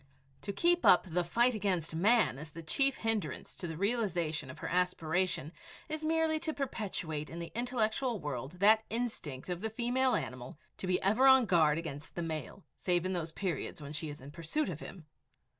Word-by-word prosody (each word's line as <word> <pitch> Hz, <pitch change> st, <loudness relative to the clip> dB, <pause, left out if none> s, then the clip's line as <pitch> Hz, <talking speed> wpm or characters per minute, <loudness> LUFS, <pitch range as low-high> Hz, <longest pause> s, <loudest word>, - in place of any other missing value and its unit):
To 205 Hz, -, -3 dB
keep 345 Hz, -, +2 dB
up 180 Hz, -, +7 dB
the 175 Hz, +2 st, +1 dB
fight 235 Hz, +8 st, +3 dB
against 185 Hz, -7 st, -1 dB
man 210 Hz, -, +3 dB
as 150 Hz, +1 st, -8 dB
the 165 Hz, +2 st, -9 dB
chief 275 Hz, -, +1 dB
hindrance 215 Hz, -10 st, -2 dB
to 175 Hz, -, -4 dB
the 160 Hz, -1 st, -5 dB
realization 175 Hz, -, 0 dB
of 130 Hz, -, -9 dB
her -, -, -5 dB
aspiration 180 Hz, -3 st, 0 dB, 0.4 s
is 310 Hz, 0 st, -4 dB
merely 320 Hz, 0 st, +2 dB
to 315 Hz, 0 st, -3 dB
perpetuate 185 Hz, -, -3 dB
in 165 Hz, -, -7 dB
the 170 Hz, -1 st, -6 dB
intellectual 240 Hz, -1 st, 0 dB
world 140 Hz, -2 st, -4 dB
that 215 Hz, +4 st, +5 dB
instinct 220 Hz, -, -3 dB
of 180 Hz, -1 st, -3 dB
the 220 Hz, -, -1 dB
female 245 Hz, +3 st, +1 dB
animal 130 Hz, -3 st, -5 dB, 0.2 s
to 185 Hz, -, -4 dB
be 180 Hz, 0 st, +2 dB
ever 220 Hz, +8 st, +4 dB
on 265 Hz, -2 st, +7 dB
guard 160 Hz, -6 st, +4 dB
against 150 Hz, -3 st, -6 dB
the 175 Hz, -, -2 dB
male, 165 Hz, +4 st, -5 dB, 0.2 s
save 175 Hz, -1 st, +1 dB
in 185 Hz, -, 0 dB
those 165 Hz, -2 st, -3 dB
periods 175 Hz, -3 st, -3 dB
when 145 Hz, 0 st, -7 dB
she 155 Hz, 0 st, -4 dB
is 145 Hz, -1 st, -8 dB
in 140 Hz, +2 st, -10 dB
pursuit 170 Hz, -, -2 dB
of 160 Hz, -4 st, -5 dB
him! 175 Hz, -2 st, -10 dB
180 Hz, 190 wpm, -32 LUFS, 160-230 Hz, 0.4 s, up